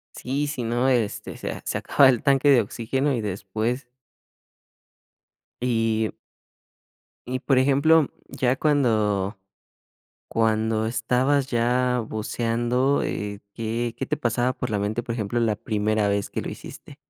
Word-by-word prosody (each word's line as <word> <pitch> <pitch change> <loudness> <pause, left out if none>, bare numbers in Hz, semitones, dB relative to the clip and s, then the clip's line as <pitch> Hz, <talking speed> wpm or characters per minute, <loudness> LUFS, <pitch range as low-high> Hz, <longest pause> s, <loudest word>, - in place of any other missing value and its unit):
Sí, 140 +4 -2
sí, 145 -4 -3
no, 120 +3 +1
este, 120 -5 -1
se - - -5
se - - -2
acaba 135 - +5
el 125 -4 +1
tanque 140 +1 +4
de 130 -4 +6
oxígeno 130 +6 -1
y 120 - -1
después 110 +5 -3 1.7
Y 115 -3 +1 1.2
Y 130 0 -1
por 135 -2 +2
ejemplo, 140 +3 +4 0.2
ya 125 0 +1
cuando 110 -9 +1 0.9
cuando 110 0 +1
estabas 125 +4 +1
ya 125 0 +1
buceando, 120 +5 0
eh, 100 -1 -4
¿qué 115 +1 -3
qué 135 - -3
te - - -1
pasaba 120 +2 0
por 125 - -4
la 105 - 0
mente, 105 +4 -1
por 115 0 -4
ejemplo, 115 0 -2
la 110 -2 +1
primera 105 -1 0
vez 100 0 -1
que - - -3
lo - - -6
hiciste? - - -10
120 Hz, 135 wpm, -24 LUFS, 110-130 Hz, 1.7 s, de